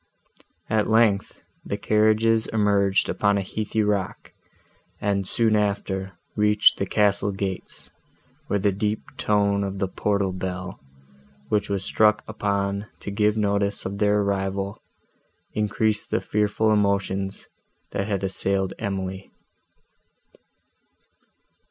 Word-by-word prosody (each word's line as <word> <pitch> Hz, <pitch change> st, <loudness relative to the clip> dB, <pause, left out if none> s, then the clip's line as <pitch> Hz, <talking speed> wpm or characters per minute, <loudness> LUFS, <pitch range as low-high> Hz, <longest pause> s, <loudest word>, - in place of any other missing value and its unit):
At 110 Hz, -1 st, +1 dB
length, 110 Hz, -3 st, +2 dB, 0.2 s
the 100 Hz, -, -3 dB
carriages 110 Hz, +2 st, +3 dB
emerged 100 Hz, -2 st, +2 dB
upon 100 Hz, -1 st, +1 dB
a 100 Hz, -, -1 dB
heathy 110 Hz, +2 st, -2 dB
rock, 100 Hz, -3 st, -2 dB, 0.7 s
and, 100 Hz, -2 st, 0 dB
soon 115 Hz, 0 st, +4 dB
after, 100 Hz, -2 st, -1 dB, 0.2 s
reached 105 Hz, 0 st, +4 dB
the 100 Hz, -, -1 dB
castle 100 Hz, 0 st, +2 dB
gates, 95 Hz, -1 st, -5 dB, 0.6 s
where 100 Hz, -, +1 dB
the 100 Hz, 0 st, +2 dB
deep 105 Hz, +2 st, -2 dB
tone 100 Hz, -1 st, +2 dB
of 100 Hz, 0 st, -4 dB
the 95 Hz, 0 st, 0 dB
portal 100 Hz, 0 st, 0 dB
bell, 90 Hz, 0 st, -5 dB, 0.7 s
which 105 Hz, -1 st, 0 dB
was 100 Hz, -1 st, -1 dB
struck 105 Hz, -1 st, +3 dB
upon 100 Hz, -1 st, -2 dB
to 100 Hz, -, -5 dB
give 105 Hz, +1 st, +1 dB
notice 100 Hz, -1 st, 0 dB
of 100 Hz, +1 st, -4 dB
their 105 Hz, 0 st, +3 dB
arrival, 100 Hz, 0 st, -2 dB, 0.7 s
increased 105 Hz, 0 st, 0 dB
the -, -, +1 dB
fearful 105 Hz, +1 st, +1 dB
emotions, 100 Hz, -2 st, 0 dB, 0.5 s
that 100 Hz, -, -2 dB
had 100 Hz, -2 st, -2 dB
assailed 95 Hz, 0 st, 0 dB
Emily. 95 Hz, -2 st, -4 dB
100 Hz, 115 wpm, -24 LUFS, 100-105 Hz, 0.7 s, soon